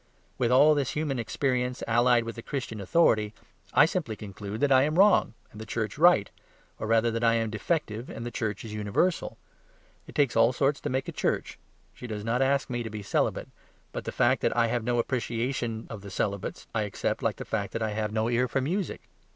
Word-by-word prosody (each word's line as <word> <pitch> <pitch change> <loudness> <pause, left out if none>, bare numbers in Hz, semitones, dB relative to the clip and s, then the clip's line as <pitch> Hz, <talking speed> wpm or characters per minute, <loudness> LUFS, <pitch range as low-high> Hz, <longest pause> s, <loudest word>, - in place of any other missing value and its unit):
With 120 -2 +2
all 145 +4 +7
this 140 -4 -1
human 150 -4 -1
experience, 125 +2 -1
allied 120 +1 +4
with 115 0 -6
the 115 - -7
Christian 120 -5 -5
authority, 110 - +2 0.4
I 150 - +6
simply 160 - -2
conclude 105 +1 -7
that 145 - +2
I 130 -1 +7
am 155 +4 +1
wrong, 200 - +5 0.2
and 105 - -10
the - - -4
church 110 +3 -3
right; 165 - +6 0.5
or - - -3
rather 115 +1 +3
that 115 +1 -2
I 115 0 +4
am 115 -1 0
defective, 115 -1 -2
while - - -7
the 120 +1 -5
church 110 -2 -3
is 110 - -7
universal. 105 - 0 0.7
It - - -12
takes 140 -4 +2
all 115 +2 +5
sorts 140 +3 +1
to - - -3
make 130 +1 -1
a - - -3
church; - - -2 0.3
she 125 - -9
does 105 -2 -5
not 120 +3 +1
ask 135 +1 +2
me 120 -1 -3
to 115 - -4
be 105 -1 -6
celibate. - - -1 0.4
But - - -6
the - - -3
fact - - +2
that - - 0
I 115 - +4
have 120 0 -1
no 120 +1 0
appreciation 120 -1 -2
of 110 -3 -7
the 100 - -9
celibates, 100 +1 -3
I 110 - +1
accept 105 -2 -2
like - - 0
the - - -7
fact - - -2
that 115 - -2
I 110 - -1
have 105 0 -2
no 110 +1 0
ear 120 +1 +2
for 135 - -1
music. 175 +8 -2
115 Hz, 220 wpm, -28 LUFS, 110-135 Hz, 0.7 s, all